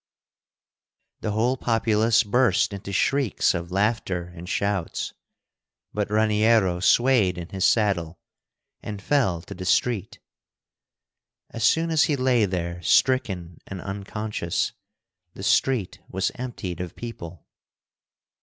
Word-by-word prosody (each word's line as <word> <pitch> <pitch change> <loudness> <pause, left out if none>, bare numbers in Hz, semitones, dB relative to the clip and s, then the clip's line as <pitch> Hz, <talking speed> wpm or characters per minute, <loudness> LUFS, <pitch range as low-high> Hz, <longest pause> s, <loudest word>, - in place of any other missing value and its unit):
The - - -3
whole 115 +5 +1
populace 115 -1 +2
burst 120 0 +2
into 100 0 -6
shrieks 135 +3 +1
of 85 0 -4
laughter 95 -3 -1
and 90 +1 -9
shouts, 100 -4 -2 0.8
but 105 -1 -1
Raniero 105 -3 +3
swayed 110 -2 +3
in 85 -1 -7
his 95 -1 -1
saddle 95 -7 +1 0.6
and 105 -2 -6
fell 100 - +1
to - - -9
the 95 - -7
street. 105 +2 0 1.3
As 115 - -5
soon 165 +8 +3
as 160 -2 +4
he 150 - +1
lay 130 -4 +2
there 85 -2 -3
stricken 95 - +1
and 95 - -6
unconscious, 100 -1 -3 0.6
the - - -8
street 125 -8 +1
was 95 +1 -1
emptied 105 -9 -5
of 90 -2 -6
people. 90 -9 -8
105 Hz, 115 wpm, -24 LUFS, 90-115 Hz, 1.3 s, as